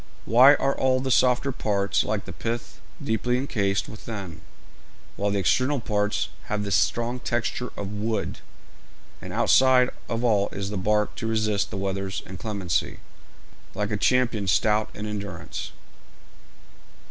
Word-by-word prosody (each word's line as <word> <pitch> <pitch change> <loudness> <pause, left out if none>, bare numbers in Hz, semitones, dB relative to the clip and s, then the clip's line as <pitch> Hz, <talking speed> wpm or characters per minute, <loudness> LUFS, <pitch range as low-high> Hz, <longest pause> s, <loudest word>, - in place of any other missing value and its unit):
Why 130 +6 +7
are 135 0 0
all 130 -1 +2
the 130 0 -2
softer 125 +2 +3
parts 100 -5 0
like 105 -2 -2
the - - -8
pith 115 +1 -5 0.2
deeply 120 +3 0
encased 100 -7 -1
within, 105 -5 -7 0.7
while 100 +1 0
the 100 - 0
external 130 +9 +2
parts 105 -2 -1 0.2
have 105 0 -2
the 100 - -4
strong 120 +5 +1
texture 120 +1 -2
of 100 0 -4
wood, 105 0 -2 0.8
and - - -8
outside 130 -1 +4 0.2
of 115 +1 -2
all 105 -4 +2
is 100 0 -4
the - - -3
bark 105 +2 +1
to 115 - -3
resist 110 -2 0
the 95 - -5
weather's 95 0 -3
inclemency, 95 -2 -2 0.8
like 105 +2 -2
a - - +1
champion 115 -2 +1
stout 105 +3 +2
in 105 - -5
endurance? 100 -7 -5
105 Hz, 140 wpm, -25 LUFS, 100-120 Hz, 0.8 s, Why